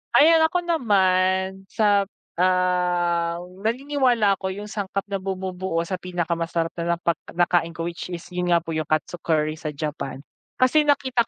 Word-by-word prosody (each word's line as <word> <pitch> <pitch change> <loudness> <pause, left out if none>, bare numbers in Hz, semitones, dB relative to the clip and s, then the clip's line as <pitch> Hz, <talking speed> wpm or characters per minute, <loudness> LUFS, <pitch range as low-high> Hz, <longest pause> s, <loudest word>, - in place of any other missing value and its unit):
ayan 325 +2 +7
ako 355 +2 -1
naman 190 - +1
sap 205 -2 +2 0.3
ah, 180 -2 +2 0.2
naniniwala 240 -3 +1
ako 190 -1 -3
yung 205 +1 -7
sangkap 195 -1 -3
na 195 - -1
bumubuo 185 -2 -3
sa 185 +2 -4
pinakamasarap 170 -2 -2
na 170 0 +1
napag 170 -1 -1 0.2
nakain 175 -1 +2
ko 165 - -4
which 170 +1 -5
is 175 -2 -6
yun 180 0 -2
nga 170 -1 +3
po 165 - -6
yung 155 -1 -2
katsu 155 +3 -1
curry 155 -1 0
sa 155 - -5
Japan. 140 -2 -5 0.3
Kasi 295 +4 +3
nakita 260 -5 +2
185 Hz, 155 wpm, -23 LUFS, 170-205 Hz, 0.3 s, ayan